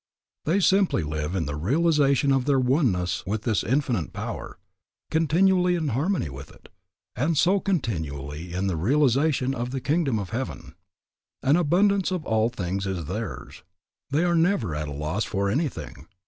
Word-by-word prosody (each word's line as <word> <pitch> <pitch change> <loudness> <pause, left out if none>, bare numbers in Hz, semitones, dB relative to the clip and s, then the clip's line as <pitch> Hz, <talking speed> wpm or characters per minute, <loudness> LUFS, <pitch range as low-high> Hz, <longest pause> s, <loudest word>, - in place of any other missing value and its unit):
They 170 +6 +2
simply 190 - +3
live 75 +3 -3
in 85 - 0
the 75 +1 -4
realization 140 - +2
of 135 -2 +2
their 140 -2 +3
oneness 125 - +1
with 105 +2 -2
this 110 -4 +1
Infinite 125 - 0
Power, - - -6 0.5
continually 180 +3 +3
in 160 -4 -1
harmony 145 - 0
with 70 +1 -9
it, - - -18 0.5
and 150 +6 0
so 185 +6 +4
continually 80 - -3
in 95 +2 -2
the 95 -4 -1
realization 135 - +2
of 120 -1 -3
the 135 +1 -3
kingdom 140 -3 0
of 100 -2 -5
heaven. 130 +3 -5 0.7
An 140 +3 +4
abundance 185 +4 +2
of 180 -4 -3
all 110 +1 +2
things 95 -2 -3
is 90 -4 -3
theirs. 105 +6 -6 0.5
They 150 +5 +1
are 175 -1 +2
never 165 - +2
at 75 0 -3
a - - -6
loss 75 +9 -2
for 100 0 -1
anything. 130 - -3
130 Hz, 160 wpm, -25 LUFS, -, 0.7 s, so